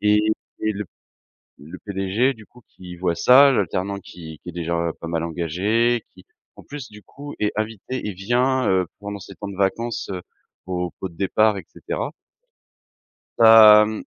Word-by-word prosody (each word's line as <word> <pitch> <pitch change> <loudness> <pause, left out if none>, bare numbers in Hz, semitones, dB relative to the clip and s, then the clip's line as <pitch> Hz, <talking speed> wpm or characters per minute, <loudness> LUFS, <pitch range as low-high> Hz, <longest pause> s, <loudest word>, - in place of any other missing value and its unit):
et 105 0 +4 0.4
le 105 -1 -2 0.8
le 75 +3 -10
PDG 100 +6 0
du 110 -3 -16
coup, 125 - -20
qui 90 -1 -11
voit, 85 -1 -1
ça, 130 +10 +7
l'alternant 100 -1 -1
qui 80 -5 -11
qui - - -12
est - - -16
déjà 85 0 -2
pas 85 - -6
mal 80 -1 -2
engagé, 100 +9 0
qui 90 0 -18 0.3
en - - -13
plus, 145 -3 -8
du 105 0 -14
coup, 145 +1 -10
est 105 - 0
invité 110 +3 -4
et - - -3
vient, 125 +6 0
heu, 95 -2 +2
pendant 105 0 -6
ses - - -11
temps 100 - -7
de 100 - -8
vacances, 110 +5 -1
heu, 90 -1 -5 0.4
au 90 -1 -3
pot 95 - -3
de 85 - -18
départ 105 +3 +2
et 95 - -7
cetera - - -4 1.3
hem, 110 -1 +7
100 Hz, 170 wpm, -22 LUFS, 90-115 Hz, 1.3 s, ça